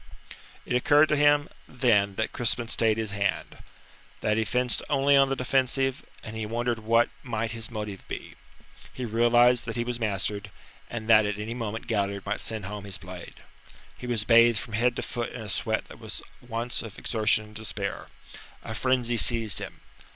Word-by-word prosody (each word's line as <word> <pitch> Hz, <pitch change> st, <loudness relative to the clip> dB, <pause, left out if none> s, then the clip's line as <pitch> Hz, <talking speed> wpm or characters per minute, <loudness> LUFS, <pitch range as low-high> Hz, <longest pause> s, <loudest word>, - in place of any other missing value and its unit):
It -, -, -1 dB
occurred 145 Hz, +4 st, +5 dB
to 150 Hz, -, +3 dB
him 145 Hz, 0 st, +4 dB, 0.2 s
then 105 Hz, -6 st, +2 dB
that 110 Hz, -, -1 dB
Crispin 120 Hz, 0 st, 0 dB
stayed 110 Hz, -2 st, +3 dB
his 110 Hz, -2 st, -2 dB
hand. 100 Hz, -1 st, -2 dB, 0.6 s
That 105 Hz, -, +1 dB
he 110 Hz, 0 st, +1 dB
fenced 125 Hz, +2 st, +1 dB
only 140 Hz, -1 st, +4 dB
on 135 Hz, -1 st, +5 dB
the 135 Hz, -, 0 dB
defensive, 135 Hz, +1 st, 0 dB, 0.2 s
and 110 Hz, -, -7 dB
he 110 Hz, -, -3 dB
wondered 120 Hz, +1 st, -1 dB
what 115 Hz, +2 st, +3 dB
might 115 Hz, -3 st, -3 dB
his 115 Hz, -1 st, -5 dB
motive 105 Hz, -4 st, -6 dB
be. -, -, -7 dB, 0.6 s
He 130 Hz, -, -4 dB
realized 120 Hz, +2 st, +4 dB
that 115 Hz, -, -4 dB
he 120 Hz, -, 0 dB
was 120 Hz, 0 st, -4 dB
mastered, 105 Hz, -1 st, -1 dB, 0.4 s
and 110 Hz, -2 st, -5 dB
that 110 Hz, -2 st, +6 dB
at 100 Hz, 0 st, -2 dB
any 105 Hz, +2 st, -4 dB
moment 115 Hz, -2 st, -4 dB
Galliard 100 Hz, -4 st, -1 dB
might 100 Hz, +1 st, -2 dB
send 110 Hz, -3 st, -3 dB
home 100 Hz, +1 st, -6 dB
his 100 Hz, -2 st, -4 dB
blade. 90 Hz, -2 st, -10 dB, 0.5 s
He 125 Hz, -, -8 dB
was 115 Hz, -3 st, +1 dB
bathed 115 Hz, 0 st, +6 dB
from 110 Hz, -, -5 dB
head 120 Hz, +3 st, +2 dB
to -, -, -3 dB
foot 120 Hz, -1 st, -4 dB
in 125 Hz, -, -6 dB
a 105 Hz, -, -7 dB
sweat -, -, -1 dB
that -, -, -13 dB
was -, -, -6 dB, 0.2 s
at 120 Hz, -, -19 dB
once 115 Hz, +1 st, -2 dB
of 110 Hz, -3 st, -9 dB
exertion 110 Hz, -1 st, +2 dB
and 105 Hz, 0 st, -16 dB
despair. 110 Hz, 0 st, -4 dB, 0.6 s
A 110 Hz, -, -5 dB
frenzy 120 Hz, 0 st, +1 dB
seized 115 Hz, -3 st, +1 dB
him. -, -, -8 dB
115 Hz, 190 wpm, -27 LUFS, 105-125 Hz, 0.6 s, that